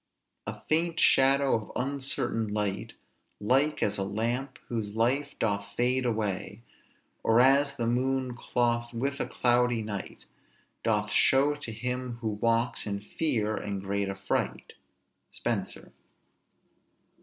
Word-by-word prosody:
"A -, -, -5 dB
faint 165 Hz, +1 st, +1 dB
shadow 135 Hz, +1 st, +5 dB
of 110 Hz, -2 st, -4 dB
uncertain 130 Hz, -4 st, -1 dB
light, 105 Hz, -2 st, -2 dB, 0.5 s
Like 135 Hz, +8 st, +2 dB
as 105 Hz, 0 st, 0 dB
a -, -, 0 dB
lamp, 120 Hz, +7 st, -2 dB
whose 110 Hz, -3 st, -3 dB
life 135 Hz, +6 st, +1 dB
doth 100 Hz, -2 st, -1 dB
fade 125 Hz, +1 st, +2 dB
away; 105 Hz, -1 st, -2 dB, 0.6 s
Or 115 Hz, +1 st, +4 dB
as 140 Hz, +2 st, +4 dB
the 115 Hz, -, -2 dB
moon 130 Hz, +1 st, 0 dB
clothed 120 Hz, -1 st, 0 dB
with 140 Hz, +4 st, -2 dB
cloudy 120 Hz, -2 st, +2 dB
night 105 Hz, -2 st, -6 dB, 0.6 s
Doth 105 Hz, -2 st, +1 dB
show 140 Hz, +2 st, +4 dB
to 145 Hz, -5 st, -7 dB
him 125 Hz, +1 st, -3 dB
who 110 Hz, -, -1 dB
walks 115 Hz, +3 st, 0 dB
in 100 Hz, -1 st, -2 dB
fear 110 Hz, -1 st, 0 dB
and 100 Hz, -1 st, -4 dB
great 100 Hz, +1 st, -2 dB
affright." 100 Hz, 0 st, -2 dB, 0.6 s
SPENSER. -, -, -3 dB
120 Hz, 120 wpm, -28 LUFS, 105-130 Hz, 0.6 s, shadow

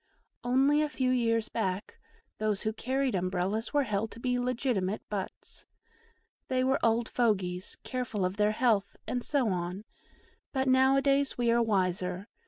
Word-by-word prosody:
Only 270 Hz, +4 st, +3 dB
a 305 Hz, -, 0 dB
few 260 Hz, -3 st, 0 dB
years 230 Hz, -3 st, +1 dB
back 195 Hz, -2 st, -3 dB, 0.4 s
those 215 Hz, -2 st, 0 dB
who 220 Hz, -, -1 dB
carried 260 Hz, +3 st, -1 dB
Umbrellas 185 Hz, +4 st, -1 dB
were 290 Hz, -1 st, +3 dB
held 215 Hz, -2 st, -1 dB
to 230 Hz, -, -11 dB
be 250 Hz, 0 st, 0 dB
legitimate 240 Hz, -5 st, -1 dB
butts. 195 Hz, -2 st, -5 dB, 0.8 s
They 255 Hz, -1 st, +1 dB
were 265 Hz, +1 st, +2 dB
old 230 Hz, 0 st, +2 dB
fogies, 190 Hz, -6 st, 0 dB
careful 240 Hz, -7 st, -2 dB
of 185 Hz, +2 st, -2 dB
their 210 Hz, 0 st, +3 dB
health, 220 Hz, -4 st, +1 dB
and 245 Hz, -1 st, -2 dB
so 270 Hz, -6 st, +1 dB
on; 180 Hz, +2 st, -3 dB, 0.7 s
but 265 Hz, -1 st, 0 dB
now 260 Hz, +1 st, +5 dB
a 275 Hz, -, +2 dB
days 280 Hz, 0 st, +2 dB
we 240 Hz, -1 st, +2 dB
are 235 Hz, 0 st, +4 dB
wiser. 185 Hz, -2 st, 0 dB
230 Hz, 160 wpm, -30 LUFS, 195-255 Hz, 0.8 s, now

